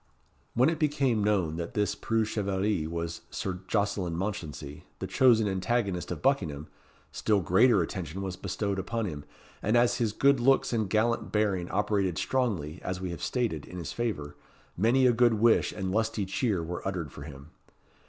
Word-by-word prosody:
When 125 +5 +5
it 160 - -4
became 135 -7 +1
known 95 -7 +1
that 85 0 -5
this 105 -2 +1
preux 115 -1 0
chevalier 100 -5 -1
was 85 0 -4
Sir 90 -1 -4
Jocelyn 100 -4 0
Mounchensey, 80 -7 -5
the - - -4
chosen 115 -5 +4
antagonist 95 -1 -1
of - - -5
Buckingham, 85 - +1 0.5
still 105 -2 +1
greater 95 +3 +4
attention 90 +2 -5
was 95 -1 -4
bestowed 100 +1 -2
upon 115 +4 -2
him; 75 -6 -6 0.4
and 110 +4 +2
as 120 0 +3
his 115 -3 0
good 140 +4 +3
looks 135 +1 +3
and 110 -4 0
gallant 115 +3 +1
bearing 100 -5 0
operated 100 -5 0
strongly, 90 - -1
as 90 0 -3
we 95 -1 -4
have 85 - -7
stated, 115 - -1
in 90 - -8
his 85 -5 -5
favour, 75 -12 -3 0.4
many 120 +7 +3
a 125 - +5
good 120 0 +4
wish 115 +2 +3
and 95 -2 -3
lusty 110 0 0
cheer 100 - 0
were 90 +2 -5
uttered 85 -7 -3
for - - -11
him. 70 +1 -10
100 Hz, 175 wpm, -29 LUFS, 85-115 Hz, 0.5 s, When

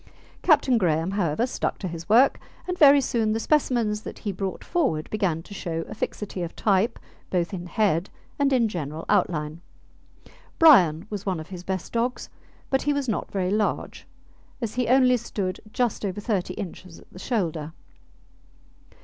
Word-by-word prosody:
Captain 285 -7 +4
Graham, 165 -1 +1
however, 195 +1 0
stuck 255 - -2
to 190 - -4
his 170 +1 -7
work, 245 +6 +5 0.3
and 360 - -1
very 285 -4 +7
soon 225 -4 0
the 225 - -1
specimens 235 -6 +1
that - - -8
he 205 - -3
brought 190 0 -4
forward 265 - 0
began 180 -7 0
to 205 - -12
show 165 -4 -4
a - - -7
fixity 205 -3 -4
of 170 -1 -5
type 205 +2 +1 0.3
both 180 +1 -1
in 180 -1 -5
head 190 -3 +1 0.3
and 280 -1 +3
in 245 -4 +3
general 160 -5 -5
outline. 155 0 0 1.0
Brian 180 - +6
was 205 -1 -5
one 185 -4 0
of 155 - -9
his 180 -2 -7
best 190 -1 -4
dogs, 235 +2 -1 0.4
but 265 - +2
he 290 - +1
was 285 -2 -2
not 220 - -2
very 185 -2 -1
large, 210 0 -1 0.5
as 230 -4 -3
he 250 -1 -1
only 255 0 +5
stood 200 -5 -4
just 240 -3 -1
over 200 0 -2
thirty 195 -4 -2
inches 185 -2 -8
at - - -20
the 185 - -10
shoulder. 165 - -2
200 Hz, 170 wpm, -25 LUFS, 175-240 Hz, 1.0 s, very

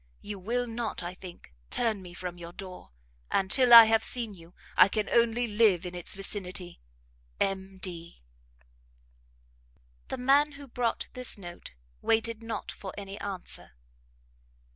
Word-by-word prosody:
You 205 -1 -6
will 240 +6 -1
not, 230 -4 -4
I 175 +1 -5
think, 180 - -12 0.2
turn 225 -4 0
me 175 -1 -11
from' 175 -1 -6
your 170 0 -9
door, 185 - -9 0.4
and, 190 0 0
till 255 -2 +4
I 230 -1 +13
have 220 0 +3
seen 235 -4 0
you, 170 -1 -16 0.2
I - - +8
can 210 +1 -2
only 235 +1 +2
live 210 -5 +3
in 180 - -5
its 175 +1 -4
vicinity. 185 -2 -2 0.6
M. 195 0 -2
D. 170 - -8 1.8
The - - -4
man 280 +4 +3
who 280 0 -11
brought 240 -2 -1
this 250 -2 0
note, 175 - -10 0.3
waited 225 0 +1
not 225 -2 -5
for 190 -2 -8
any 200 0 -7
answer. 190 - -6
200 Hz, 145 wpm, -29 LUFS, 180-230 Hz, 1.8 s, I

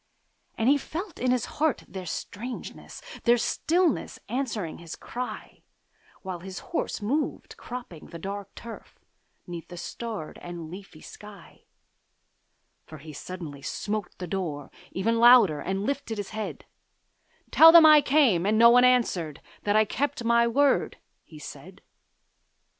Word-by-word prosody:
And 225 - 0
he 285 +2 +5
felt 345 +6 -7
in 255 - 0
his 250 -2 +1
heart 310 -4 -1
their 185 -2 -8
strangeness, 240 +9 -7 0.2
Their 240 0 +5
stillness 335 +7 0
answering 225 - -3
his 170 -2 -8
cry, 250 +1 -7 0.6
While 185 -2 -5
his 185 +1 -8 0.2
horse 270 - -2
moved, 285 +9 -2
cropping 240 -10 -9
the 170 - -9
dark 200 +3 -7
turf, 235 -1 -11 0.5
'Neath 170 -2 -8
the 175 - -10
starred 215 -3 -6
and 170 -2 -8
leafy 185 -4 -11
sky; 205 -4 -13 1.2
For 155 - -10
he 155 +1 -11
suddenly 155 -3 -8
smote 210 +7 -3
on - - -34
the 180 - -5
door, 160 -6 -4 0.2
even 230 +5 0
Louder, 235 -10 +7
and 195 +2 -3
lifted 275 -5 -3
his 205 -1 -5
head: 215 0 -6 0.9
'Tell 325 +1 +9
them 335 -1 +9
I 305 -1 +8
came, 265 - +3
and 215 +1 +2
no 235 +1 +8
one 245 +1 +6
answered, 190 - +2 0.3
That 205 0 +2
I 215 0 +5
kept 285 +3 -2
my 235 0 +3
word,' 280 +4 +2 0.3
he - - -14
said. - - -11
215 Hz, 145 wpm, -26 LUFS, 180-250 Hz, 1.2 s, Tell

